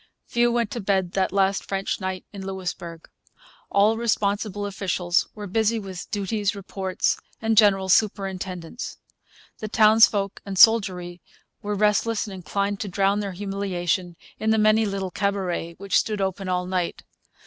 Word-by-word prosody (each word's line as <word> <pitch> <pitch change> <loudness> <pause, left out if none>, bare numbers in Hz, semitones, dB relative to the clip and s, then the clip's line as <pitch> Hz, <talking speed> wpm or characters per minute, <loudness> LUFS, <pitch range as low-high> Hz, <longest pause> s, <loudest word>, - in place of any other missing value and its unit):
Few 240 0 +2
went 235 -3 0
to 235 - -4
bed 190 -2 0
that 190 0 0
last 195 0 +1
French 195 0 -3
night 185 0 -4
in 195 -1 -7
Louisbourg. 175 -3 -6 0.6
All 210 +3 +3
responsible 205 -2 -1
officials 190 -3 0
were 210 -1 -6
busy 220 +3 +1
with 190 -4 -7
duties, 205 0 -1
reports, 190 -1 -2 0.2
and 225 0 +1
general 200 -3 +5
superintendence. 190 -1 -1 0.6
The 215 - -4
townsfolk 215 -2 +4
and 195 -1 -6
soldiery 180 -5 +4 0.4
were 205 0 -2
restless 210 +2 +1
and 205 - -8
inclined 200 +3 -2
to 210 - -3
drown 195 +2 +1
their 200 -2 -3
humiliation 185 -3 -2 0.2
in 220 - 0
the 220 - +4
many 215 0 +4
little 195 -2 -3
cabarets, 185 -4 -2
which 200 0 +2
stood 215 -2 -2
open 190 0 -2
all 180 0 0
night. 180 -1 -2
195 Hz, 150 wpm, -24 LUFS, 185-210 Hz, 0.6 s, general